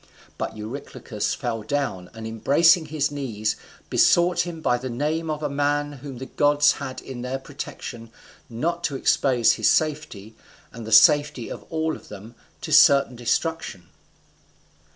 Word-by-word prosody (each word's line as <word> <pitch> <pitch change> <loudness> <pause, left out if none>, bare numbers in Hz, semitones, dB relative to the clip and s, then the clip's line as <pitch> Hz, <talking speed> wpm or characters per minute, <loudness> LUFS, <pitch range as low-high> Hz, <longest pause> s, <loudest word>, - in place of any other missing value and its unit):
But - - -4
Eurylochus 110 -2 -5
fell 115 -2 -3
down, 120 -8 -3
and, 110 0 -8
embracing 155 +9 +3
his 150 -1 -1
knees, 115 -7 -2 0.3
besought 175 0 +3
him 170 -2 -6
by 125 -5 +1
the 130 +1 -5
name 155 +6 -2
of 155 0 -3
a - - +1
man 145 +1 -1
whom 140 -2 -9
the 130 - -7
gods 145 +1 +3
had 130 -2 -6
in 130 -2 -8
their 125 +2 -3
protection, 130 -4 -8 0.4
not 170 +9 -2
to 140 - -2
expose 130 -3 +3
his - - +2
safety, 145 -9 -1 0.4
and 115 -1 -9
the - - -6
safety 145 +3 +5
of - - -6
them - - -22
all, 160 0 -2 0.6
to - - -6
certain 140 -2 +6
destruction. 120 - -2
140 Hz, 150 wpm, -23 LUFS, 120-150 Hz, 0.6 s, certain